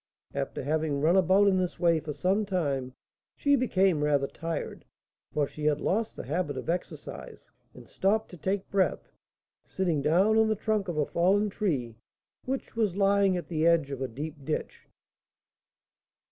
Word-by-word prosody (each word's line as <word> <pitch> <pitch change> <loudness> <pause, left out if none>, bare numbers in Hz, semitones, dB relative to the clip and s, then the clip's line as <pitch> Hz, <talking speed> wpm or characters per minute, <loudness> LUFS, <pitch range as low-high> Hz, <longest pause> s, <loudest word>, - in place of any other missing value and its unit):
After - - -3
having 155 0 0
run 160 +5 +3
about 190 +2 +5
in 190 -1 +3
this 180 -1 -2
way 170 -2 +3
for 155 0 -6
some 185 +8 +1
time, 140 -10 -2 0.4
she 285 0 +3
became 190 - +2
rather 145 -2 +2
tired, 165 +3 -5 0.5
for 150 - +1
she 150 +2 -7
had 150 -1 +2
lost 220 +3 -1
the - - -6
habit 150 -1 -2
of 145 - -2
exercise, 175 - -7 0.2
and - - -13
stopped 215 +3 0
to 180 - -10
take 190 +3 -2
breath, 195 -2 0 0.5
sitting 175 -6 -1
down 190 +9 +3
on 220 - +4
the 215 - +1
trunk 215 -1 -1
of 170 -3 -3
a 150 - +2
fallen 195 +6 +2
tree 135 - -2 0.5
which 265 -1 -4
was 215 -6 +1
lying 200 -1 +3
at 175 - -6
the 160 -1 +1
edge 165 -4 +3
of 135 -1 -5
a 130 - -1
deep 145 +4 -7
ditch. 155 +3 -4
175 Hz, 170 wpm, -28 LUFS, 150-195 Hz, 0.5 s, about